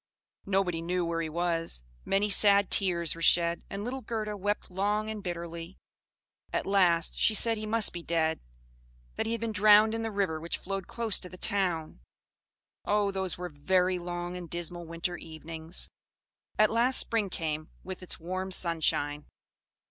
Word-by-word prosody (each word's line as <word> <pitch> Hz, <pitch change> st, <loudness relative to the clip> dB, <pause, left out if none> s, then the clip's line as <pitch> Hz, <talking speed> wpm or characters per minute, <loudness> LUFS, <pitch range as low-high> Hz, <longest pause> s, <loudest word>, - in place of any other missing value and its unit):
Nobody 190 Hz, -4 st, +1 dB
knew 175 Hz, +1 st, -1 dB
where 165 Hz, 0 st, -1 dB
he 160 Hz, -, -3 dB
was; 165 Hz, -, -1 dB, 0.2 s
many 195 Hz, +2 st, +2 dB
sad 200 Hz, 0 st, +6 dB
tears 175 Hz, -4 st, +2 dB
were 165 Hz, -, -10 dB
shed, 170 Hz, 0 st, +4 dB
and 200 Hz, +1 st, -5 dB
little 260 Hz, +3 st, -4 dB
Gerda 215 Hz, -3 st, -3 dB
wept 205 Hz, 0 st, -2 dB
long 210 Hz, +3 st, 0 dB
and 215 Hz, -1 st, -6 dB
bitterly; 170 Hz, -1 st, -6 dB, 0.7 s
at -, -, -1 dB
last 180 Hz, -4 st, +2 dB
she 220 Hz, -, +4 dB
said 225 Hz, +2 st, +5 dB
he 215 Hz, 0 st, -5 dB
must 225 Hz, 0 st, +2 dB
be 175 Hz, -, -5 dB
dead; 160 Hz, -1 st, 0 dB, 0.8 s
that -, -, -2 dB
he -, -, -1 dB
had 230 Hz, -, -3 dB
been 230 Hz, -1 st, -1 dB
drowned 215 Hz, +1 st, +6 dB
in 225 Hz, -, -2 dB
the 225 Hz, -, -2 dB
river 195 Hz, -6 st, -1 dB
which 170 Hz, -, -1 dB
flowed 195 Hz, 0 st, -5 dB
close 230 Hz, -3 st, +1 dB
to 180 Hz, -, -6 dB
the 185 Hz, -, -11 dB
town. 180 Hz, -, -1 dB, 0.8 s
Oh! 205 Hz, -1 st, +1 dB
those 190 Hz, -2 st, -2 dB
were 180 Hz, 0 st, -5 dB
very 180 Hz, +4 st, +1 dB
long 175 Hz, 0 st, -5 dB
and 175 Hz, -2 st, -7 dB
dismal 175 Hz, 0 st, -5 dB
winter 170 Hz, +2 st, -3 dB
evenings! 160 Hz, +1 st, -4 dB, 0.7 s
At 215 Hz, 0 st, +4 dB
last 240 Hz, +3 st, +3 dB
spring 220 Hz, -4 st, 0 dB
came, 155 Hz, -3 st, -3 dB
with 190 Hz, 0 st, -7 dB
its 185 Hz, -, -4 dB
warm 185 Hz, +3 st, -4 dB
sunshine. 155 Hz, -5 st, 0 dB
180 Hz, 170 wpm, -29 LUFS, 170-205 Hz, 0.8 s, sad